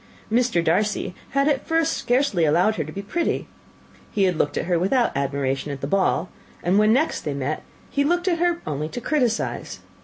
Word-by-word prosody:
Mr. 230 -7 +2
Darcy 190 +3 +1 0.2
had 275 +1 +2
at 285 -3 0
first 325 0 +2
scarcely 245 - +1
allowed 175 +8 +3
her 160 - 0
to 155 - -8
be 200 +5 -6
pretty: 335 +12 -1 0.6
he 200 - 0
had 185 -2 +2
looked 145 -1 0
at - - -1
her 175 -1 +1
without 235 - +1
admiration 140 0 -1
at 140 - -5
the 135 - -4
ball; 190 +4 +1 0.4
and 185 +4 +3
when 215 +1 +5
they 245 - +5
next 315 - -2
met, 140 +1 -2 0.3
he 280 - +2
looked 350 +5 +1
at 340 -3 +2
her 345 0 +1
only 150 +1 -3
to 245 - -5
criticise. 245 -3 -1
200 Hz, 195 wpm, -23 LUFS, -, 0.6 s, when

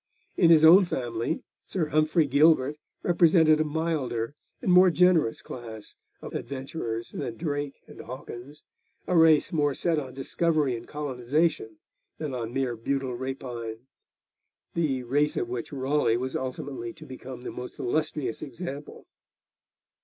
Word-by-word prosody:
In 170 - +5
his 160 -1 +7
own 180 +5 +9
family, 120 -2 -2 0.2
Sir 165 -5 -1
Humphrey 155 +2 +3
Gilbert 145 0 +4 0.3
represented 165 -3 +5
a - - +4
milder 150 -6 -2 0.3
and 185 - 0
more 180 +1 +7
generous 170 -8 +3
class 110 -3 -8 0.3
of - - -7
adventurers 130 -4 -4
than 115 - -5
Drake 145 -3 -3
and - - -11
Hawkins, 130 +3 -9 0.4
a 180 - 0
race 160 -2 +5
more 145 -3 +1
set 165 -3 +1
on 130 -3 -8
discovery 150 -1 +1
and 115 0 -8
colonisation 145 -3 -1 0.4
than 150 -4 -4
on 115 -2 -4
mere 130 -2 -1
brutal 130 +3 -2
rapine, 120 -3 -5 0.9
the 140 -6 0
race 145 +5 +1
of 120 - -1
which 120 -1 -4
Raleigh 135 -3 +1
was 130 +2 -3
ultimately 130 -2 -4
to 155 - -13
become 130 -2 -9
the - - -5
most 125 0 -8
illustrious 150 -2 -1
example. 145 -1 -7
140 Hz, 140 wpm, -27 LUFS, 125-155 Hz, 0.9 s, own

